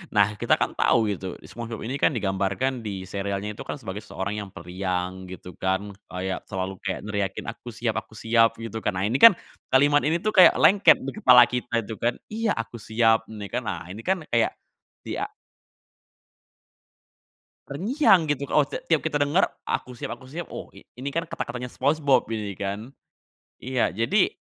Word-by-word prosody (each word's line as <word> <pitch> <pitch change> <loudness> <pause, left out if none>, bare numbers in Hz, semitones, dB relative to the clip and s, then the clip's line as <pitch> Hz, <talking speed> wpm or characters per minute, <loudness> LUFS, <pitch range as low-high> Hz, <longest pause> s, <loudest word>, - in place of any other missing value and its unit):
Nah 105 +1 +4
kita 105 - +2
kan - - -1
tahu 110 -3 +2
itu, 95 -1 -6
SpongeBob 115 -1 -7
ini 130 +4 -3
kan, - - +5
digambarkan 105 +2 -1
di 100 -3 -5
serialnya 100 +2 -3
itu - - -10
kan, - - -5
sebagai 105 -6 -6
seseorang 105 0 -4
yang 100 - -8
periang 90 +1 -4
gitu 90 -1 -9
kan, 95 +2 -1 0.2
kayak 95 +1 -3
selalu 95 -1 -3
kayak 95 - -3
neriakin, 100 -2 -3
"Aku 115 +3 -7
siap 115 0 -2
aku 110 - -17
siap." 115 0 +3
Gitu 115 -1 -6
kan. 100 - -1
Nah 95 - 0
ini 120 +6 0
kan, 225 -6 +10 0.3
kalimat 145 +2 +4
ini 160 +4 +1
tuh 215 - +1
kayak 185 - +7
lengket 200 +1 +6
di 135 - -3
kepala 125 -1 +8
kita, 120 -2 -2
tuh 110 - -8
kan, 120 +1 +1 0.2
"Iya, 225 0 0
aku 115 0 -5
siap." 110 +1 +2
Ini 105 -2 -7
kan, - - 0
nah - - -5
ini 110 - -8
kan, 185 0 -1
kayak 115 -1 +2 0.5
dia - - -3 2.4
terngiang 195 - +3
gitu, 140 -1 -1
oh, 150 - +5
t - - -4
tiap 160 -3 +3
kita 150 -2 -1
dengar, 145 +6 +3 0.2
"Aku 125 -1 -3
siap 120 - -5
aku 130 +2 -16
siap." 170 +4 -5
Oh, - - -7
i - - -14
ini 130 +3 -4
kan, 165 +4 -1
kata-katanya 125 -5 -4
Spongebob 140 -1 +2
ini 105 -3 -3
kan. 100 +4 -4 0.7
Iya, 130 -1 +1
jadi, 135 - +2
115 Hz, 180 wpm, -25 LUFS, 100-135 Hz, 2.4 s, kan